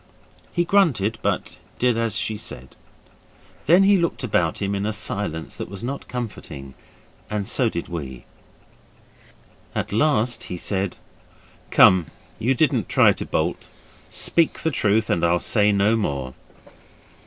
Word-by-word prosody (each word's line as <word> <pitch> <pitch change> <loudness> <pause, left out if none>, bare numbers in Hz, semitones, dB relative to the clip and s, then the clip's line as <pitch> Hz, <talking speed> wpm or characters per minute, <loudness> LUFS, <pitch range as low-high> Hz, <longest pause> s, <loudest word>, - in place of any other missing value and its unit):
He 175 -1 0
grunted, 125 - +2
but - - -2 0.2
did 125 -1 +2
as 115 -2 -1
she 110 - -2
said. 65 -10 -9 0.9
Then 175 +5 +6
he 195 -1 +5
looked 170 -5 -1
about 85 -9 +1
him 100 0 -1
in 100 0 -2
a 110 - -1
silence 95 -6 -3
that - - -6
was 100 +1 -6
not 140 +3 -5
comforting, 80 - -7 0.6
and 105 -2 -2
so 125 -4 +2
did 85 -5 -5
we. 70 -8 -7 1.5
At - - -2
last 125 -1 +1
he 90 - -5
said 95 +1 -2 0.7
'Come, 90 -4 +6 0.3
you 130 +4 +1
didn't 125 - +1
try - - +5
to - - -6
bolt. - - -2 0.4
Speak 165 -2 +1
the 160 - 0
truth, 110 -4 +2
and 85 - 0
I'll 85 +1 +3
say 105 +3 +2
no 100 +2 +3
more. 70 - -2
105 Hz, 145 wpm, -23 LUFS, 90-125 Hz, 1.5 s, Then